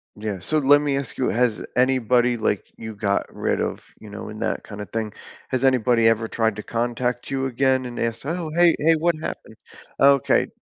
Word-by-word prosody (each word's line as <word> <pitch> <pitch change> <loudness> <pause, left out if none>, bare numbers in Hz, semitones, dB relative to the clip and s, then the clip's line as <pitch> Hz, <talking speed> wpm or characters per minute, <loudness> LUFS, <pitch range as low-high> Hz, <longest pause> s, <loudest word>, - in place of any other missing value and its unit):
Yeah, 105 -2 -4
so 155 +13 -1
let 145 +1 +5
me 145 -2 0
ask 140 - -5
you, 130 - 0
has 120 -2 0
anybody, 125 -1 +2
like, 105 -2 0
you 110 -1 -8
got 100 -1 -1
rid - - -1
of, - - -3 0.2
you 110 - -12
know, 100 +1 -8
in 110 0 -8
that - - -2
kind 105 -1 -8
of 105 - -8
thing, 110 -2 -3 0.4
has 130 -1 -1
anybody 125 -3 +3
ever 115 0 +2
tried 110 -1 0
to 105 - -7
contact 120 +1 -2
you 135 -1 -1
again 130 0 +1
and 120 -1 -6
ask, 115 +1 -2
"Oh, 165 +1 -3
hey, 175 -1 +5
hey, 165 +2 +4
what 170 +1 +1
happened?" - - -7 0.4
Okay. 140 -1 +4
120 Hz, 205 wpm, -23 LUFS, 110-135 Hz, 0.4 s, let